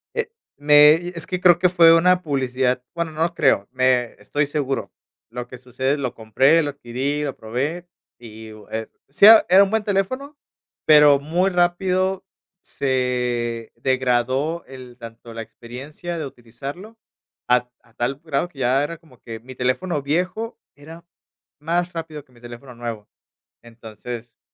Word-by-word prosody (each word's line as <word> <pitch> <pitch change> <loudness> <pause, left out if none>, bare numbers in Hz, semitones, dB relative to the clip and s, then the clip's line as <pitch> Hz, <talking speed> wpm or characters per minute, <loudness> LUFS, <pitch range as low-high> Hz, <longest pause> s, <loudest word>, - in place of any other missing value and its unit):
Eh, 465 0 -2 0.3
me 150 +1 +7 0.2
es 165 -2 -6
que 180 - -3
creo 175 -2 +5
que 180 0 +3
fue 170 -2 +6
una 180 +2 +3
publicidad, 130 -4 -1
bueno, 170 -1 -3
no 155 +1 -1
lo 170 0 -1
creo 135 -11 +2
me 130 -2 +1
estoy 145 +9 -1
seguro. 140 -2 -3 0.4
Lo 120 +1 -7
que 125 - -10
sucede 130 +3 -2
lo 130 -4 -3
compré, 130 +9 +3
lo 145 - -2
adquirí, 140 +2 -3
lo 140 -2 -4
probé, 140 +10 -4 0.3
y 110 -2 -11
uh, 110 -1 -15
eh, 110 0 -4 0.2
sí 145 +8 +4
era 220 +1 +9
era 190 +2 +7
un 195 - -1
buen 220 +1 0
teléfono, 255 +9 -2 0.5
pero, 150 -2 +7
muy 170 +7 0
rápido 185 +1 0 0.4
se 125 -3 -2
degradó 130 +5 0
el 130 -2 -12
tanto 115 0 -11
la 115 - -6
experiencia 135 +10 -8
de 155 - -4
utilizarlo, 140 - -10 0.5
a 125 0 +3
t 125 - -42
a 115 - -26
tal 120 +4 -2
grado 155 0 -1
que 145 - -16
ya 130 +2 +2
era 170 +3 -5
como 150 -7 -22
que 115 -1 -9
mi 130 +3 -12
teléfono 140 +6 -1
viejo 180 +10 -2 0.2
era 160 +4 -13 0.5
más 175 +3 -1
rápido 160 -3 -7
que - - -29
mi 120 - -21
teléfono 120 +1 -11
nuevo. 115 -3 -6 0.6
Entonces 115 +1 -10
140 Hz, 160 wpm, -21 LUFS, 125-170 Hz, 0.6 s, era